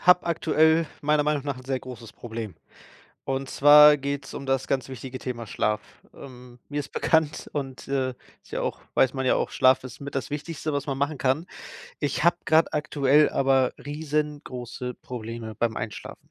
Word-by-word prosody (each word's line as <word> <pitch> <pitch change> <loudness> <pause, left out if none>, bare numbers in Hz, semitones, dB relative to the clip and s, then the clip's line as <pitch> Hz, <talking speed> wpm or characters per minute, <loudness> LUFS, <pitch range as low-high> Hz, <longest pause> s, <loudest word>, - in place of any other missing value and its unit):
habe 180 0 +5
aktuell 160 -1 +3
meiner 150 0 +3
Meinung 150 -2 0
nach 140 -3 -2
'n 130 - -12
sehr 135 0 -1
großes 125 -4 -10
Problem. 110 -4 -7 0.7
Und 135 0 -2
zwar 150 +2 +8
geht's 140 0 -4
um - - -6
das 135 -1 0
ganz 135 -1 -1
wichtige 130 0 -7
Thema 120 -3 -5
Schlaf. 105 0 0 0.3
Ähm, 125 -2 -12
mir 145 0 -2
ist 140 - -9
bekannt 160 -2 +1
und, 135 -3 -5
äh, 135 -1 0 0.3
ist - - -21
ja - - -2
auch - - -3
weiß 130 0 +3
man 130 -1 -2
ja 130 - +4
auch, - - 0
Schlaf 130 0 +4
ist 130 -2 -9
mit 140 0 -7
das 135 -3 -2
Wichtigste, 150 +1 -4
was 140 -1 -1
man 135 -3 -3
machen 145 +2 0
kann. 135 +5 0 0.5
Ich 145 +1 -1
habe 170 0 +4
grad 160 +1 +4
aktuell 150 -1 +3
aber 135 -1 +2
riesengroße 145 -5 -4
Probleme 115 -2 -7
beim 115 +1 -1
Einschlafen. 110 -1 -7
135 Hz, 180 wpm, -26 LUFS, 125-150 Hz, 0.7 s, zwar